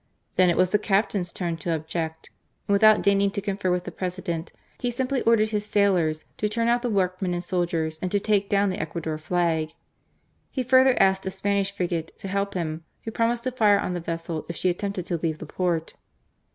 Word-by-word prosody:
Then 185 -1 +5
it 170 - +1
was 185 0 +3
the 210 - +3
captain's 195 -3 0
turn 170 -2 -3
to 165 +1 -1
object, 160 +1 -4 0.4
and 200 - +2
without 215 +1 +6
deigning 200 0 +3
to 200 - -3
confer 200 -1 -2
with 180 0 +1
the - - -6
President, 180 -3 -4 0.3
he 245 - -1
simply 255 +2 -1
ordered 220 -2 +3
his 210 -1 -2
sailors 180 -7 +2
to 210 - 0
turn 230 +2 0
out 240 +1 +3
the 245 - -1
workmen 185 -3 0
and 175 - -3
soldiers, 170 -3 -1
and 185 - -2
to 205 - +2
take 200 -1 +1
down 200 -1 +2
the - - -3
Ecuador 160 0 -4
flag. 160 -1 0 0.8
He 260 - -2
further 260 +1 +5
asked 190 0 +3
a - - +1
Spanish 200 +1 0
frigate 175 -4 -3
to - - -7
help 200 +1 -2
him, 165 -2 -3 0.2
who 225 - -5
promised 235 +1 +1
to 255 - -1
fire 215 -5 +4
on 180 - -2
the 175 - -2
vessel 165 -1 -4
if 170 - -4
she 185 - +1
attempted 195 0 -3
to 175 - -1
leave 160 -1 -1
the - - -8
port. 170 -3 -1
190 Hz, 210 wpm, -25 LUFS, 170-205 Hz, 0.8 s, without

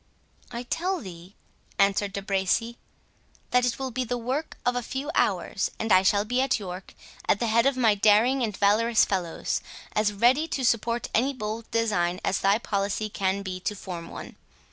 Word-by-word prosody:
"I 240 0 -5
tell 360 +8 -1
thee," 180 - -11 0.4
answered 200 0 +2
De 200 - -4
Bracy, 200 +5 0 0.7
"that 250 0 +3
it 240 - -1
will 265 -1 -4
be 255 +2 -1
the 245 0 -2
work 260 +7 -3
of 245 - +2
a 245 - 0
few 270 +5 -4
hours, - - 0
and 225 - -2
I 185 - +7
shall 200 +2 +2
be 250 +3 +1
at 270 -3 +1
York—at 190 +1 -4
the 235 - 0
head 230 +3 +3
of 275 -1 +1
my 230 -4 +4
daring 215 +6 +4
and 215 -5 -2
valorous 220 +3 +4
fellows, 180 -4 -2 0.3
as 210 0 +2
ready 245 +9 +3
to 270 -5 -2
support 230 +1 +1
any 265 +5 +2
bold 220 -2 -5
design 185 -6 0
as 190 - +1
thy 200 +2 +3
policy 205 -1 -2
can 195 0 -1
be 185 -1 -5
to 210 +3 -3
form 180 -4 -7
one. - - -9
220 Hz, 185 wpm, -26 LUFS, 195-245 Hz, 0.7 s, I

